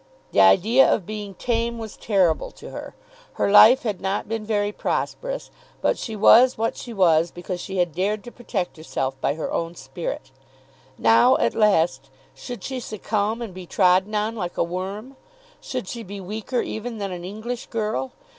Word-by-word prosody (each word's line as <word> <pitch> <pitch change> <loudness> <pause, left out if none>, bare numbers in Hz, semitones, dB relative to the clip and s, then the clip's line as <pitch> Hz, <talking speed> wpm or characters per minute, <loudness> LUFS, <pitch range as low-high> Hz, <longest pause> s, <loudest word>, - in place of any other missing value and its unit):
The 100 - +4
idea 210 - +5
of 195 - 0
being 210 -1 -6
tame 235 +2 -1
was 220 -2 -7
terrible 185 -7 +1
to - - -11
her. - - -8 0.4
Her - - 0
life 230 +5 +8
had 210 -5 -3
not 195 +1 -2
been 225 0 -3
very 205 -1 0
prosperous, - - -3 0.3
but - - +1
she 225 - -6
was 245 +5 +6
what 225 +1 -1
she 240 - -8
was 170 -5 +3
because 175 +1 -6
she 190 - -5
had 175 -3 +1
dared 200 +4 -1
to 240 - -9
protect 205 -9 -4
herself 135 -4 -3
by 140 - 0
her 160 - -4
own 170 +1 -2
spirit. 135 0 -6 0.7
Now, 115 0 +5
at 115 - +1
last, 160 -11 +2 0.2
should 230 - -8
she 265 -1 -4
succumb 215 0 -2
and 215 -5 -7
be 180 -1 -9
trodden 190 +3 +3
on 215 +2 -1
like 180 -5 -5
a - - +3
worm? 195 +9 -5 0.4
Should 255 -7 -5
she 235 - -5
be 200 -1 -8
weaker 215 +6 -3
even 225 +1 -5
than 200 -2 -4
an 175 -1 -6
English 220 +6 -6
girl? 225 +3 -2
205 Hz, 180 wpm, -23 LUFS, 180-225 Hz, 0.7 s, life